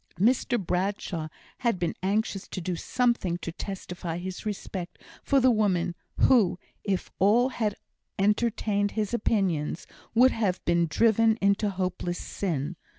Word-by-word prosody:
Mr 240 +3 +3
Bradshaw 180 -3 -2 0.3
had 235 -5 +1
been 175 -2 -1
anxious 195 0 -1
to - - -5
do 180 0 -2
something 235 -3 0
to 175 - -5
testify 180 -2 -5
his 185 +4 -5
respect 190 -3 -5 0.2
for 275 - +3
the 255 0 +5
woman, 195 -6 +1 0.3
who, 210 -9 +5 0.3
if 195 -3 -2
all 230 +7 +4
had 215 -5 -1 0.4
entertained 210 0 +1
his 215 +1 -1
opinions, 190 -9 0 0.3
would 255 +3 +6
have 195 -5 0
been 170 0 +3
driven 225 +4 +3
into 200 +2 +2
hopeless 180 -2 -2
sin. 165 -3 -3
195 Hz, 135 wpm, -27 LUFS, 180-220 Hz, 0.4 s, would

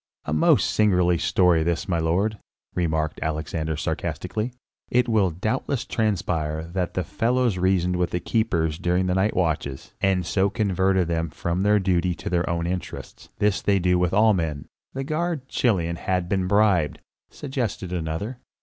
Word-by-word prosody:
"A 75 - -2
most 75 - +3
singular 90 -5 +3
story 85 0 +3
this, 85 +1 -1
my 85 -3 0
lord," 95 +7 0 0.3
remarked 80 -3 -1
Alexander 80 0 -2
sarcastically. 110 +9 -3 0.4
"It 125 0 +2
will 110 -5 +3
doubtless 110 - -2
transpire 85 -8 -1
that 90 -2 -2
the 90 - 0
fellows 120 -3 0
reasoned 90 -1 +2
with 90 -2 +1
the 90 - -2
keepers 85 -7 0
during 90 +1 +1
the 90 - +1
night 95 +3 +1
watches, 80 -6 -2
and 95 -2 +2
so 95 +3 +1
converted 95 -3 +1
them 85 -1 -1
from 85 +4 -2
their 105 +1 +4
duty 90 -2 +1
to - - -6
their 90 0 +1
own 85 0 -1
interests; 90 +1 -6
this 105 -1 +1
do 100 -1 +2
they 90 0 +2
with 90 -1 +2
all 110 +2 +5
men." 80 -6 -2 0.3
"The 135 - -2
guard, 155 -1 -2
Chilion, 85 -11 0
hath 90 -1 -1
been 95 -1 0
bribed," 95 -7 +3 0.3
suggested 120 -10 -4
another. 90 +9 -3
90 Hz, 160 wpm, -24 LUFS, 85-105 Hz, 0.4 s, all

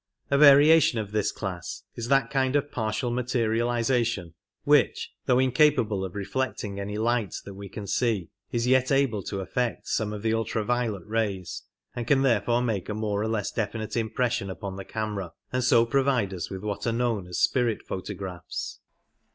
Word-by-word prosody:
A 140 - +4
variation 145 -1 +7
of 105 -2 -3
this 105 -1 +1
class 95 -5 -5
is 115 - -5
that 135 -3 +3
kind 130 0 +1
of 145 0 0
partial 110 +1 -1
materializa 120 0 +1
tion 95 -8 -3 0.3
which, - - +3 0.2
though 125 - +4
incapable 130 -6 +3
of 95 -1 -6
reflecting 105 -1 -3
any 105 +1 -4
light 115 -2 0
that 100 - -8
we 100 0 -9
can 105 - -7
see, 105 -4 0 0.2
is 120 0 0
yet 130 +1 +3
able 135 -7 +2
to 95 +1 -4
aflect 120 +4 -2
some 110 -1 0
of 105 0 -6
the 110 0 +2
ultra 115 -1 -1
violet 115 -6 -1
rays, 105 -5 -2 0.3
and 120 -1 -4
can 135 -2 +4
therefore 120 -1 +2
make 110 -6 -2
a 105 - -2
more 105 -2 -1
phouSraphs - - 0
or - - -1
less 105 -3 -1
definite 110 -1 -3
impression 115 -2 0
upon 95 +1 -6
the 95 0 -7
camera, 105 -5 -4 0.2
and 125 0 +1
so 120 -1 +5
provide 125 -5 +1
us 90 -3 -4
with 95 0 -6
what 105 +2 -3
are - - +2
known 115 -5 -1
as 90 - -5
"spirit 120 -4 +1
photographs". 95 -1 -6
115 Hz, 185 wpm, -26 LUFS, 100-125 Hz, 0.3 s, variation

